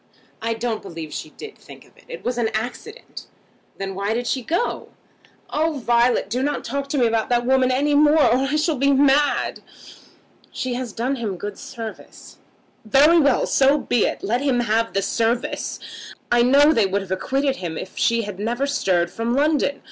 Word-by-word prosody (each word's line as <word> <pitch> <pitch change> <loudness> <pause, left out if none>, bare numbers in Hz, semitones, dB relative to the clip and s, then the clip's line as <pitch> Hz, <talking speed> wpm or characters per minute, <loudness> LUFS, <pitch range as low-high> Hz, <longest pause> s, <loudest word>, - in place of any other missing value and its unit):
"I 230 0 -1
don't 225 -1 -3
believe 165 -5 -8
she 155 - -6
did 430 - -11
think - - -14
of - - -25
it. - - -22
It - - -9
was 245 0 -1
an 225 -2 +1
accident." 245 - -6 0.5
"Then 195 0 -4
why 200 +3 -2
did 245 +1 -2
she 260 +2 -1
go?" 345 - -2 0.6
"Oh, 320 +2 0
Violet, 240 -4 +2
do 240 +5 -2
not 290 +1 -2
talk 275 +3 -4
to 290 - -1
me 250 - +3
about 225 -1 0
that 240 -1 +1
woman 260 0 +3
any 285 +3 +1
more, 300 +2 +5
or 240 - +4
I 295 - 0
shall 305 0 +1
be 275 +2 +3
mad." 280 +1 +2 0.9
"She 255 -1 -3
has 245 -2 -4
done 250 +6 -2
him 210 -6 -4
good 205 +2 -7
service." 225 -2 -10 0.4
"Very 285 +9 +5
well; 280 -5 +3
so 275 +2 +3
be 245 -5 +1
it. - - -5
Let 240 +5 0
him 265 -4 +1
have 230 0 0
the 195 - 0
service. 230 +4 -1 0.5
I 240 0 +4
know 280 +5 +5
they 220 -7 +2
would 200 +1 -1
have 190 - -12
acquitted 270 +8 -1
him 165 -3 -5
if 190 - -8
she 230 0 +1
had 200 -2 -7
never 240 +6 -1
stirred 185 -11 0
from 230 +2 -2
London. 285 -1 +1
245 Hz, 195 wpm, -22 LUFS, 220-280 Hz, 0.9 s, more